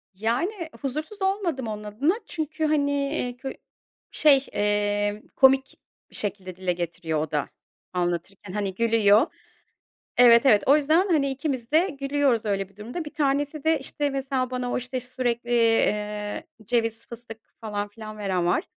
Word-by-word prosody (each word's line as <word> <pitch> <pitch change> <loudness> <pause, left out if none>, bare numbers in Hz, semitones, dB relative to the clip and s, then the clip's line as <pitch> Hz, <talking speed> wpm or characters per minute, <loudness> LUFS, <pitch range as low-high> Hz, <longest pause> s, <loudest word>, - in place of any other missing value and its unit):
Yani, 320 - -1
huzursuz 310 +9 -4
olmadım 365 - 0
onun 210 -1 -5
adına. 230 - +1
Çünkü, 315 0 -3
hani, 290 -2 +2
eee, 275 -3 -1
kö 265 +1 -5 0.6
şey, 280 -3 +5
eee, 205 0 0
komik 265 0 +4 0.3
bir - - -14
şekilde 190 -3 -3
dile 185 -1 -1
getiriyor 170 -2 -3
o 155 0 -3
da 150 -2 -1 0.4
anlatırken. 180 +2 -3
Hani, 200 -2 -2
gülüyor. 225 - +4 0.9
Evet, 240 +1 +7
evet. 210 -6 +6
O 280 +3 +6
yüzden, 315 +6 +3
hani, 280 -5 +2
ikimiz 265 -3 -3
de 335 +5 +4
gülüyoruz 275 -5 +1
öyle 195 -2 -1
bir 200 - -26
durumda. 245 +11 -5
Bir 295 - -9
tanesi 285 0 0
de, 320 -2 +3
işte, 290 +2 -2
mesela 270 -2 -1
bana 250 -1 -2
o, - - 0
işte, 250 +1 -3
sürekli, 245 -1 -2
eee, 210 -3 +1 0.2
ceviz, 230 0 -1
fıstık 235 -1 -9 0.2
falan 205 -2 -3
filan 215 +1 -10
veren 190 -4 -1
var. 175 - +2
240 Hz, 155 wpm, -25 LUFS, 205-280 Hz, 0.9 s, Evet